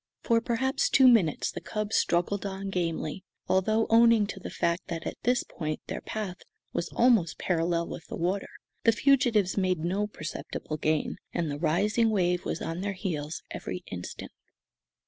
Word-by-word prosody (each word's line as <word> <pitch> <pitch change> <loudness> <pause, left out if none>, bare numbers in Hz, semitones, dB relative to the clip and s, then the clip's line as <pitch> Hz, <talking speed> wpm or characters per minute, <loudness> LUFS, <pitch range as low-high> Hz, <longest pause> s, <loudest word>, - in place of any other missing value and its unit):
For 230 -1 +3
perhaps 255 +4 0
two 265 -1 +6
minutes 205 - +4
the - - -6
cub 215 -1 -3
struggled 175 +3 +1
on 195 0 -4
gamely, 170 0 -2 0.2
although, 215 +4 +2
owing 230 -2 +6
to 200 -1 -6
the - - -7
fact 170 +1 -1
that 165 -2 -4
at - - -2
this 245 +1 +2
point 155 -2 -4
their - - -5
path 205 -4 -4 0.4
was 170 - -2
almost 230 -9 +4
parallel 170 -1 0
with - - -8
the - - -5
water, 185 +4 -1 0.3
the 230 - +5
fugitives 235 -6 +3
made 185 -2 +2
no 200 +4 0
perceptible 155 -4 -6
gain, 155 0 0 0.2
and 165 -3 -1
the 145 - -4
rising 205 +8 +2
wave 180 -4 +1
was - - -3
on 165 +2 -3
their 200 0 -2
heels 160 -5 -4
every 180 - -5
instant. 90 -1 -6
190 Hz, 165 wpm, -28 LUFS, 170-220 Hz, 0.4 s, two